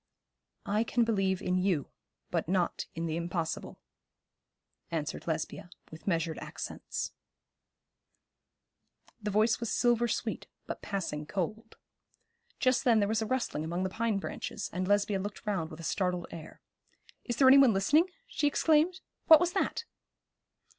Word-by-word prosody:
'I 210 +3 +1
can 240 +1 +2
believe 195 -4 +1
in 180 0 +1
you, 180 -7 0 0.4
but - - 0
not 180 -2 0
in 165 +1 -2
the 160 -1 -2
impossible,' 170 -1 -3 1.1
answered 160 -2 -3
Lesbia, 160 +2 -3 0.2
with 160 +4 -12
measured 165 -3 0
accents. - - -5 2.1
The 210 - -2
voice 215 +2 +3
was 235 - -3
silver 240 -1 +3
sweet, - - -3 0.2
but - - -6
passing 170 -7 -3
cold. 215 +6 -4 0.8
Just 255 -2 +3
then 240 -4 +5
there 200 - +2
was 220 +1 0
a 220 - -1
rustling 240 - -1
among 170 +3 -2
the 190 - 0
pine 225 0 0
branches, 195 - -5
and 185 0 -2
Lesbia 205 0 +2
looked 205 +2 -6
round 190 -7 -1
with 155 - -10
a - - -8
startled 180 +2 -1
air. 160 -2 -10 0.6
'Is 240 - -3
there 265 +2 +5
any 270 +1 +9
one 270 -4 +7
listening?' 290 - +3 0.2
she 310 -11 0
exclaimed. 320 +5 +3 0.3
'What 320 -2 +10
was 355 +1 0
that?' 385 - -1
200 Hz, 145 wpm, -30 LUFS, 175-235 Hz, 2.1 s, What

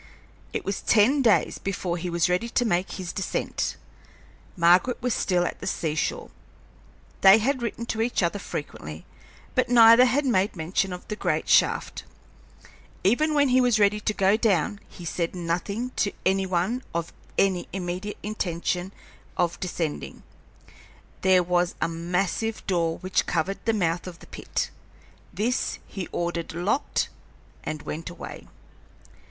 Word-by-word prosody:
It - - -3
was 195 - -2
ten 235 +7 +4
days 225 -5 +3
before 185 -3 -2
he 175 +1 -4
was 170 +1 +2
ready 180 +6 0
to 245 +1 +1
make 180 -3 0
his 185 -3 -5
descent. 190 - -2 0.8
Margaret 180 +8 +4
was 250 -1 0
still 180 -2 +1
at - - -4
the - - -6
sea 160 -3 -1
shore. 155 - -2 0.9
They 195 +2 +9
had 255 +4 0
written 235 0 -3
to 225 -1 -2
each 230 -4 +1
other 175 +4 0
frequently, 80 - -7 0.5
but - - +1
neither 230 0 +8
had 275 +3 +1
made 200 -6 +2
mention 180 +3 -1
of 180 0 -7
the 210 - -3
great - - -1
shaft. - - +2 1.0
Even 300 +10 +3
when 285 -2 +4
he 255 +1 +5
was 245 -3 +3
ready 210 0 +4
to 210 - 0
go 195 +1 +4
down 200 -3 +1
he 175 - -11
said 170 +1 -2
nothing 180 +8 -2
to 200 - +1
any 190 0 +2
one 185 +8 0
of 170 0 -2 0.2
any 190 -3 +2
immediate 185 +2 -4
intention 180 -3 -2 0.5
of 175 -1 0
descending. 170 -4 -4 1.0
There 185 -1 +5
was 175 0 +1
a - - +1
massive 180 +6 -2
door 170 -3 0
which 185 0 0
covered 195 +1 -1
the 225 - +3
mouth 175 -4 0
of 175 -2 -8
the - - -15
pit; - - -4 0.6
this 235 +4 -1
he 190 -3 -6
ordered 170 -1 -3
locked 200 +11 0 0.5
and 155 -1 -5
went 165 +3 -5
away. 175 - -9
190 Hz, 150 wpm, -26 LUFS, 175-220 Hz, 1.0 s, They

